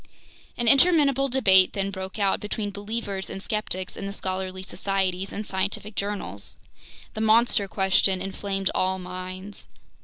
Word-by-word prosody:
An 240 - -1
interminable 275 -1 +5
debate 190 -8 +5
then 195 0 -2
broke 190 0 -6
out 200 -2 +2
between 210 0 -3
believers 205 -1 -4
and - - -6
skeptics 195 -2 -3
in 195 - -5
the - - -4
scholarly 185 -1 -4
societies 195 -1 -1
and 210 - -5
scientific 200 +3 -3
journals. 200 - -2 0.6
The 220 - -4
"monster 220 -2 +4
question" 190 -1 +2
inflamed 195 0 -2
all 185 0 +1
minds. 185 +2 -8
195 Hz, 135 wpm, -25 LUFS, 190-210 Hz, 0.6 s, interminable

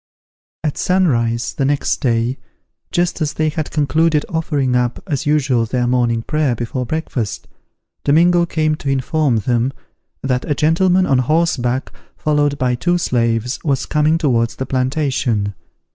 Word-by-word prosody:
At 150 -3 -2
sun 185 0 +2
rise 115 -2 0
the 140 - -2
next 140 +1 +1
day, 120 -1 0 0.5
just 175 -1 0
as 150 -1 0
they 155 0 0
had 155 -1 -3
concluded 155 +1 +1
offering 145 -6 0
up, 125 -1 0
as 145 -7 -2
usual, 135 -6 +2
their 125 +1 0
morning 120 -2 +1
prayer 150 -4 0
before 120 +2 -4
breakfast, 140 -8 -3 0.6
Domingo 170 +4 +4
came 155 -2 0
to 140 - -4
inform 135 0 +1
them 120 +3 0 0.5
that 130 -2 0
a 145 - +1
gentleman 180 +5 +3
on 135 -5 +2
horseback, 130 -3 0 0.3
followed 145 -1 +1
by 125 -2 +1
two 175 +8 +1
slaves, 120 -5 0
was 140 -4 0
coming 150 +1 +2
towards 120 -8 +1
the 130 - -4
plantation. 130 -6 0
140 Hz, 145 wpm, -18 LUFS, 125-155 Hz, 0.6 s, Domingo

